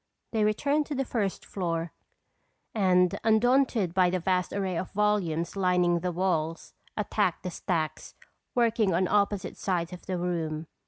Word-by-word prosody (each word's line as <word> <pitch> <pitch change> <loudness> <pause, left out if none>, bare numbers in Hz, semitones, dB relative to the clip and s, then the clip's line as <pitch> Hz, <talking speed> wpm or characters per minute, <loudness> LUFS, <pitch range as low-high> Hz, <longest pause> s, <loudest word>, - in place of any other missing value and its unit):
They 220 -2 +1
returned 280 +8 +1
to 295 - -3
the 270 0 -1
first 205 -6 -2
floor 170 -3 -3 0.8
and 180 -4 +3
undaunted 225 -3 +3
by 185 -1 +4
the 185 - 0
vast 180 +1 0
array 190 -2 -2
of 180 +2 -3
volumes 190 -6 0
lining 180 -2 +2
the 180 +1 -2
walls, 165 -3 -1 0.2
attacked 205 -3 0
the 180 - -3
stacks, 165 -2 -3 0.4
working 225 -6 +2
on 185 +1 +2
opposite 205 -1 0
sides 180 -2 -1
of 180 - -11
the 185 -1 -1
room. 165 -3 -2
185 Hz, 150 wpm, -28 LUFS, 175-210 Hz, 0.8 s, by